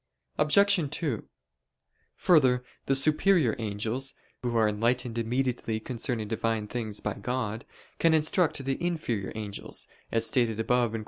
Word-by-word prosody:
Obj. 175 +1 +4
2: 145 -5 -3 0.9
Further, 130 -8 +4 0.2
the 135 - +3
superior 155 - +4
angels, 110 +5 -2 0.3
who 120 -2 -1
are 110 -1 +4
enlightened 115 +2 0
immediately 120 -1 -1
concerning 115 -2 -2
Divine 115 0 -1
things 110 -2 -4
by 105 - -2
God, 120 -2 -3 0.3
can 165 -1 +4
instruct 155 -2 +2
the 135 +5 -2
inferior 125 - -2
angels, 105 -2 -4 0.2
as 115 0 +2
stated 115 -3 +1
above 120 0 +1
(Q. 115 - -2
120 Hz, 130 wpm, -28 LUFS, 110-140 Hz, 0.9 s, Obj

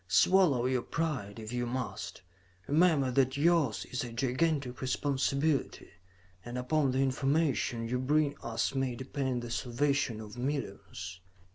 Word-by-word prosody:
Swallow 145 - +4
your 130 -1 +1
pride 130 -13 -3
if 110 +1 -7
you 120 0 -1
must; 105 -9 -4 0.4
remember 150 -4 +3
that 130 +1 +2
yours 155 -6 +2
is 130 - -3
a 120 - -6
gigantic 130 +1 0
responsibility, 140 +2 0 0.5
and 120 +1 -6
upon 135 +3 +1
the 130 - 0
information 135 -3 +1
you 125 +2 -1
bring 145 +2 +2
us 115 +2 -1
may 135 -2 -1
depend 130 -1 -2
the 120 - -6
salvation 125 -1 0
of 110 +2 -9
millions. 100 -9 -4
130 Hz, 135 wpm, -31 LUFS, 120-145 Hz, 0.5 s, Swallow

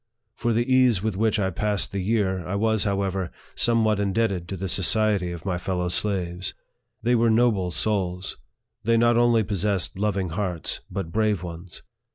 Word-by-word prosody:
For 120 - -1
the 115 +1 +1
ease" 130 -6 +4
with 110 -3 -1
which 110 +2 +1
I 95 -2 0
passed 105 +2 -1
the 100 - -3
year, 95 -1 0
I 95 - -2
was, 110 0 +1
however, 95 -3 -1 0.2
some 115 -1 +2
what 110 -2 +2
indebted 100 -3 0
to 95 - -5
the 95 +2 -3
society 100 0 +3
of 85 0 -8
my 90 -3 -1
fellow 90 -1 -2
slaves. 90 -1 -2 0.5
They 120 +1 +2
were 115 -1 +3
noble 110 -5 +2
souls; 90 -1 -1 0.5
they 115 +1 +3
not 120 +1 +4
only 120 -1 +4
possessed 100 -1 -1
loving 100 -3 0
hearts, 90 -1 -3
but 90 -3 -4
brave 105 -2 +1
ones. 85 0 -9
100 Hz, 175 wpm, -24 LUFS, 90-110 Hz, 0.5 s, ease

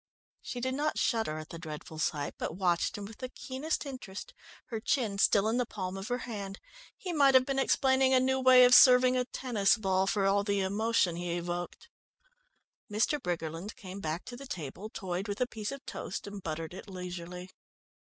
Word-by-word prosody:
She 245 - -5
did 260 +1 -1
not 300 +3 -1
shudder 220 - 0
at 155 0 -8
the 165 - -8
dreadful 155 -1 -8
sight, 145 -2 -1
but - - -3
watched 175 -1 +1
him 205 - -6
with 210 +1 -11
the 255 - -5
keenest 270 +5 -4
interest, 250 -8 -8 0.4
her 225 - -3
chin 220 -4 0
still 200 +1 +4
in 225 +2 +1
the 250 - +1
palm 185 -4 -5
of 195 +1 -6
her 245 - 0
hand. 200 -4 -6 0.4
He 360 -2 -5
might 280 -4 +5
have 255 0 +6
been 270 0 -1
explaining 265 0 +3
a 260 - +6
new 265 +1 +1
way 255 -1 +8
of 245 - +5
serving 250 0 +8
a 250 0 +1
tennis 235 -6 +1
ball, 190 -2 +1
for 200 -1 +1
all 200 +1 +3
the 200 -1 0
emotion 195 -2 +1
he 175 0 -2
evoked. 175 0 -5 1.0
Mr. 225 +8 +1
Briggerland 170 +2 -4
came 190 0 -8
back 160 -1 -3
to 245 - -8
the 275 +2 -10
table, 180 - -6
toyed 185 0 -4
with 205 0 -4
a 250 - +3
piece 220 -2 -5
of 275 0 -8
toast - - -5
and 200 -1 -7
buttered 160 0 -5
it 190 +2 -9
leisurely. 180 0 -7
205 Hz, 200 wpm, -30 LUFS, 180-255 Hz, 1.0 s, way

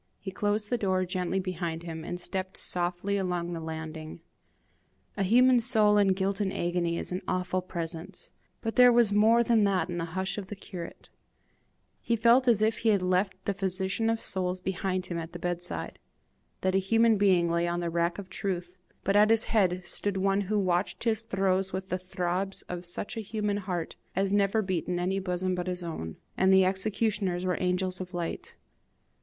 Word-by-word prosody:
He 190 - -6
closed 205 +1 -1
the 245 - +1
door 185 -2 +1
gently 185 0 -1
behind 170 -3 -4
him, 160 -2 -6
and 175 +2 -5
stepped 185 +1 -3
softly 180 +3 +1
along 175 -2 -2
the 165 - -4
landing. 160 0 -7 0.9
A 200 - -3
human 245 +6 +5
soul 215 -4 +4
in 195 -2 +4
guilt 195 +2 -1
and 195 -2 0
agony 170 -1 -1
is - - -2
an 180 +2 -2
awful 185 0 -1
presence, 165 -2 -6 0.3
but 225 -1 -4
there 250 0 +8
was 235 -3 +4
more 225 +3 +5
than 230 -2 +3
that 190 -2 +1
in 175 - -3
the 165 +1 -5
hush 190 +2 -1
of 195 - -8
the 205 - -6
curate: 180 -3 -9 0.9
he 235 - +1
felt 235 +3 +4
as 220 -3 +4
if 220 +1 +1
he 225 - +2
had 200 -3 +3
left 185 +1 0
the 200 - 0
physician 190 +3 0
of 225 0 -1
souls 185 -1 -2
behind 185 0 -2
him 170 -2 -4
at 165 0 -7
the - - -5
bedside; 175 0 -4 0.6
that 185 0 +1
a 190 - +4
human 225 +4 +3
being 185 -4 +4
lay 170 +1 +1
on 175 0 -1
the 170 -1 -2
rack 170 +1 0
of 200 - -6
the - - -30
truth, 180 -2 -4 0.3
but 195 - +1
at 210 +1 +6
his 225 0 +5
head 185 -5 +1
stood 200 +1 -1
one 195 +1 +2
who 205 +2 -1
watched 185 -1 0
his 220 -2 +1
throes 195 -3 0
with 190 +1 -5
the 185 - -1
throbs 185 +1 -2
of 180 0 -6
such 190 +6 -2
a - - -3
human 210 -1 -2
heart 180 -4 -4 0.2
as 195 +1 +1
never 205 +2 +2
beat 185 -3 -2
in 180 - -1
any 190 +2 0
bosom 185 0 -1
but 180 0 -3
his 180 -1 -3
own, 80 - -6 0.2
and 190 0 +3
the 190 0 +6
executioners 195 -1 0
were 180 -1 0
angels 185 0 0
of 180 -1 -7
light. 170 -1 -4
190 Hz, 200 wpm, -28 LUFS, 175-205 Hz, 0.9 s, there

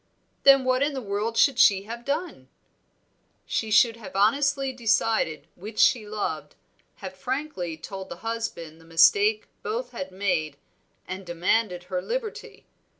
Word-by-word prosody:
"Then 275 -1 +7
what 255 0 +2
in 290 +1 +1
the - - -2
world 215 0 -3
should 270 -3 +4
she 195 -2 +5
have 235 +3 -8
done?" 310 +6 -3 1.0
"She 220 - -2
should 225 +2 +4
have 215 -4 -11
honestly 275 +6 +2
decided 220 - 0
which 210 +4 -10
she 225 -5 +4
loved, 215 -1 -4 0.4
have 190 -3 -8
frankly 190 - -4
told 190 +3 -8
the - - -6
husband 200 -9 -5
the - - -18
mistake 415 - +4
both 475 +3 -4
had 185 0 -6
made, 180 -7 -1 0.5
and 185 +1 -6
demanded 180 +2 0
her 180 0 -3
liberty. 465 - -5
215 Hz, 145 wpm, -25 LUFS, 185-265 Hz, 1.0 s, Then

